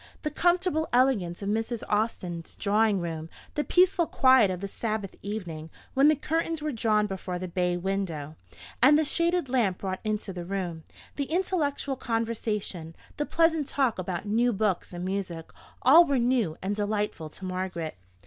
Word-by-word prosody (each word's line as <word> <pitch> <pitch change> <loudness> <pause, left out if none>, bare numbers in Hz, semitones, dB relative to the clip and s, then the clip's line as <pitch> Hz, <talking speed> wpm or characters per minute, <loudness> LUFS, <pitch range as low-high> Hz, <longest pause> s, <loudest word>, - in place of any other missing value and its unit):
The 300 - -1
comfortable 350 -2 +1
elegance 225 -9 +2
of 200 - -2
Mrs. 225 +2 -2
Austin's 185 -6 -2
drawing 210 -1 +2
room, 165 -1 -5 0.2
the 300 - 0
peaceful 360 -1 +3
quiet 260 -6 +5
of 185 -1 -3
the 200 - -4
Sabbath 215 -1 -3
evening, 175 -6 -5 0.2
when 275 +2 +5
the 310 - +5
curtains 325 +2 -1
were 305 0 -2
drawn 220 -3 +2
before 190 -2 -4
the 185 +1 -5
bay 180 0 0
window, 175 -5 -3 0.5
and 290 +3 +7
the 310 - +2
shaded 340 +1 +1
lamp 235 -8 +1
brought 190 -1 -4
into 215 -2 -2
the 175 -1 -5
room; 175 -3 -4 0.3
the 285 - 0
intellectual 305 -5 -1
conversation; 215 -8 -3 0.2
the 295 - -2
pleasant 325 -3 +2
talk 260 -8 0
about 180 +1 -3
new 230 +4 +2
books 205 -3 -1
and 175 0 -5
music: 185 -4 -4 0.3
all 310 +7 +9
were 280 -5 +1
new 235 -9 +1
and 200 +2 -1
delightful 205 -6 -2
to 190 - -8
Margaret. 185 -3 -3
210 Hz, 165 wpm, -27 LUFS, 185-270 Hz, 0.5 s, all